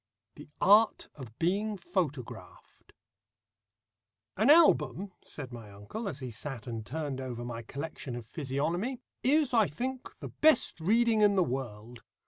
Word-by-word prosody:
THE 150 - -13
ART 210 +3 +4
OF 120 -6 -11
BEING 200 +5 0
PHOTOGRAPHED 170 - -5 1.4
"An 220 +7 +2
album," 195 - +5
said 130 -5 -8
my 115 -4 -9
uncle, 105 - -6
as 145 -6 -7
he 125 -2 -5
sat 120 +1 -6
and 115 -3 -5
turned 140 +2 -4
over 120 -2 -5
my 115 -1 -5
collection 140 +1 -6
of 120 -2 -7
physiognomy, 165 - -2 0.2
"is, 285 0 +2
I 220 -4 +5
think, 255 - -5
the - - -7
best 310 - +3
reading 220 +5 +3
in 205 -1 +5
the 185 - +4
world. 120 -4 -5
150 Hz, 140 wpm, -30 LUFS, -, 1.4 s, album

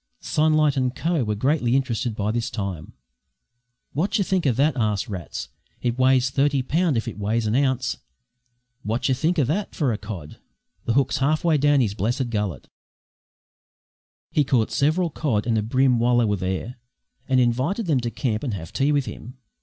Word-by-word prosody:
Sunlight 155 -2 +2
and 130 -1 0
Co. 165 -4 0
were 105 -1 -1
greatly 130 +1 +1
interested 120 -3 -1
by 105 0 -1
this 120 +2 -2
time. 95 -7 -5 1.0
"Wot 185 +9 0
yer 200 - +2
think 185 -4 0
o' - - +4
that?" 140 +6 +2
asked 105 -4 0
Rats. 95 -5 -6 0.3
"It 120 0 -2
weighs 130 0 +3
thirty 140 0 +2
pound 160 0 +1
if 115 - -2
it - - -6
weighs 110 +3 0
an 105 - 0
ounce! 130 -2 +1 0.9
Wot 110 +4 -1
yer 135 - +3
think 165 +7 0
o' 150 - +4
that 170 - -2
for 140 -8 +1
a 105 - -4
cod? 95 -8 -8 0.5
The 115 - +1
hook's 135 0 +1
half 150 +3 +1
way 160 -3 +3
down 145 -1 +4
his 105 -5 0
blessed 120 +4 -1
gullet!" 105 -5 -3 1.6
He 150 - +3
caught 125 -5 +1
several 155 +4 +1
cod 125 -9 -1
and 115 -1 +1
a 110 - +2
bream 125 +2 +2
while 120 +1 +3
they 120 - +4
were 105 -1 +1
there, 95 +6 -4 0.5
and 130 -1 +3
invited 130 - +1
them 150 -6 +2
to 120 -1 -2
camp 115 -2 -2
and 125 -8 -2
have 80 -3 -8
tea 140 +2 +2
with 145 -3 +1
him. 120 +3 -9
125 Hz, 190 wpm, -23 LUFS, 110-145 Hz, 1.6 s, o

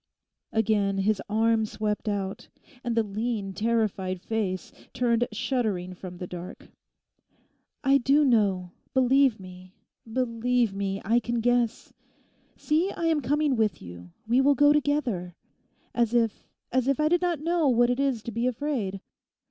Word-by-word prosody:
Again 205 -3 +1
his 200 +1 +1
arm 225 +1 +2
swept 210 0 -2
out, 195 -2 -3 0.4
and 235 -2 -2
the 225 - +4
lean 210 -1 -3
terrified 205 -3 -1
face 190 -2 -3 0.2
turned 240 -1 +1
shuddering 215 -6 -2
from 180 -1 -9
the 180 - -5
dark. 175 0 -9 1.1
'I 275 0 +4
do 280 +4 +3
know; 200 -8 +2 0.2
believe 260 -2 +4
me, 185 0 -12 0.4
believe 245 -2 0
me! 195 0 -2
I 230 +4 +3
can 240 0 -2
guess. 240 -1 0 0.6
See, 330 +6 0
I 335 - -3
am 320 -2 +2
coming 290 +2 +1
with 220 -3 0
you; 90 0 -11 0.2
we 245 +3 +4
will 285 +1 +4
go 290 +2 +5
together. 260 - -1 0.6
As 235 -1 +1
if, 230 -3 0 0.2
as 255 0 +1
if 275 +1 +1
I 305 - +3
did 350 +2 +2
not 350 -4 0
know 330 0 +1
what 240 0 +3
it 245 - -1
is 270 -5 0
to 235 - -5
be 230 +3 -1
afraid. 240 -7 -2
230 Hz, 150 wpm, -26 LUFS, 195-260 Hz, 1.1 s, go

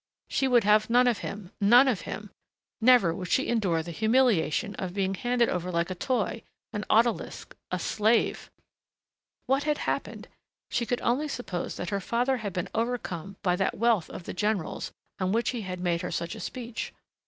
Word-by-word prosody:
She 270 - +1
would 245 -3 +4
have 210 +2 +4
none 245 +2 +5
of 240 -4 +2
him... 200 -3 -7
none 240 +7 +7
of 240 -8 +1
him.... 210 -1 -6 0.5
Never 230 -8 +6
would 180 +2 -5
she 265 - +1
endure 190 -9 +1
the 170 - -7
humiliation 220 - +2
of 185 -1 -4
being 195 -1 0
handed 240 +4 +1
over 180 0 -2
like 170 +1 0
a - - 0
toy, 230 +3 -1 0.3
an 210 -1 -3
odalisque, 230 +1 +1
a - - -1
slave.... 220 +2 +1 1.0
What 270 +2 +1
had 300 -1 +1
happened? - - -3 0.4
She 235 -1 0
could 245 +2 -1
only 265 +6 +1
suppose 220 -11 -4
that 175 - -5
her 200 -1 -1
father 245 +6 +1
had 210 -4 -4
been 180 0 -3
overcome 200 -6 -3
by 180 -2 +2
that 190 - 0
wealth 225 -6 +2
of - - -8
the - - -6
general's 205 -1 -2 0.3
on 185 0 0
which 230 0 +1
he 240 -3 -4
had 185 -2 -5
made 175 -2 0
her - - -3
such 170 0 -3
a - - -8
speech. 240 -2 -5
215 Hz, 190 wpm, -28 LUFS, 185-240 Hz, 1.0 s, none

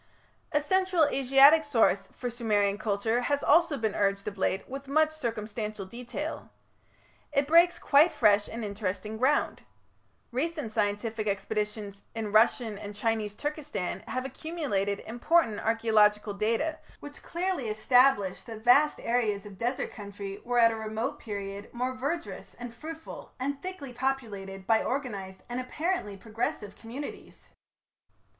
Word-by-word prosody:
A 295 - +2
Central 370 +1 +3
Asiatic 275 +3 +6
source 230 -8 +2
for 245 -1 -5
Sumerian 205 -4 +1
culture 220 +2 0
has 285 +3 0
also 325 -1 +4
been 220 -4 -1
urged 200 0 0
of 205 - -3
late 190 0 -1
with 275 +1 -7
much 310 +3 +3
circumstantial 215 -6 -4
detail. 240 +5 -6 0.8
It 280 -1 +2
breaks 340 +3 +6
quite 300 +5 +5
fresh 205 -2 +3
and 230 -1 -5
interesting 205 +1 -4
ground. 270 +4 +2 0.7
Recent 295 -1 -2
scientific 215 +1 -1
expeditions 210 0 -3
in 220 -2 -3
Russian 220 0 +3
and 205 0 -8
Chinese 215 -1 -1
Turkestan 295 - -3
have 255 0 -3
accumulated 265 - -2
important 240 0 +2
archaeological 215 -2 +3
data 230 +10 0 0.2
which 290 0 -10
clearly 345 -8 -2
establish 215 -2 +3
that 220 -2 -9
vast 280 +5 +5
areas 220 -4 0
of 200 -2 -11
desert 245 +3 -1
country 200 -2 -7
were 245 0 -1
at 230 -1 +6
a - - -3
remote 220 +5 -3
period 200 -2 -6
most 255 +1 -2
verdurous 330 +6 -4
and 240 -1 -8
fruitful, 320 +6 -9
and 280 +2 -2
thickly 365 -9 -6
populated 215 -7 -3
by 220 +2 +3
organized 205 -9 -4
and 245 +1 -3
apparently 275 - -2
progressive 215 -1 -4
communities. 250 +6 -9
230 Hz, 135 wpm, -29 LUFS, 210-280 Hz, 0.8 s, Asiatic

